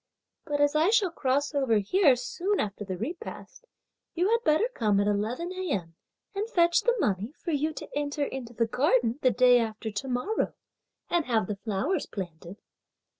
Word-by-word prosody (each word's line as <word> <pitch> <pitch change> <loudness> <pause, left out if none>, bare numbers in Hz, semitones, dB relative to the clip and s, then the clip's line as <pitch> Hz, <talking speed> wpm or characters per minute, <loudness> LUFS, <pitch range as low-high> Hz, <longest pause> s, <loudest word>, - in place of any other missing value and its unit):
But 290 -1 -2
as 290 0 +3
I 315 +5 +4
shall 420 -5 +3
cross 280 0 0
over 265 -5 +2
here 275 - +4
soon 360 +11 -2
after 205 0 -3
the 190 -2 -5
repast, 350 - -7 0.5
you 355 +4 +2
had 465 0 +2
better 315 +5 +3
come 210 - +2
at 200 - +2
eleven 220 - -1
a.m., 270 - -3 0.4
and 410 +3 -3
fetch 340 -5 +3
the 480 0 +2
money, 210 - -1
for 345 - -4
you 305 +1 0
to - - -8
enter 290 0 -1
into 260 -4 -6
the 230 0 +1
garden 250 0 +1
the 255 - +5
day 250 0 +5
after 220 -1 -3
to 210 +7 -4
morrow, 255 - -1 0.6
and 345 -3 +2
have 225 -5 +1
the 205 +1 -4
flowers 235 - -2
planted!" 175 -1 -7
265 Hz, 175 wpm, -28 LUFS, 220-340 Hz, 0.6 s, the